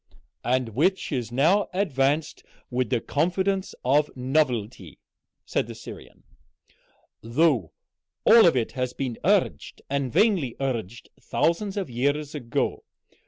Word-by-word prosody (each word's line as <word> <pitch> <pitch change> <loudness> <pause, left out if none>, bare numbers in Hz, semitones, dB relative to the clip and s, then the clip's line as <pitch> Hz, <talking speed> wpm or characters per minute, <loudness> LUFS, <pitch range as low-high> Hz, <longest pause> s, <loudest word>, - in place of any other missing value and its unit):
"And 125 -1 0
which 170 - 0
is 120 -5 -2
now 165 +11 +3
advanced 150 -5 0 0.3
with 125 -2 0
the 120 - +1
confidence 185 - -1
of 145 +4 +3
novelty," 125 - -1 0.5
said - - -1
the - - -8
Syrian, - - -12 1.0
"though 120 - +1 0.5
all 225 -3 +8
of 165 - +3
it 115 - -1
has 125 -1 -3
been 130 -4 -4
urged, 185 - 0
and 140 -3 -1
vainly 175 - +2
urged, 120 -5 -4
thousands 195 +4 0
of 195 -4 -2
years 145 +5 -1
ago. 125 -6 -2
135 Hz, 120 wpm, -25 LUFS, 120-170 Hz, 1.0 s, all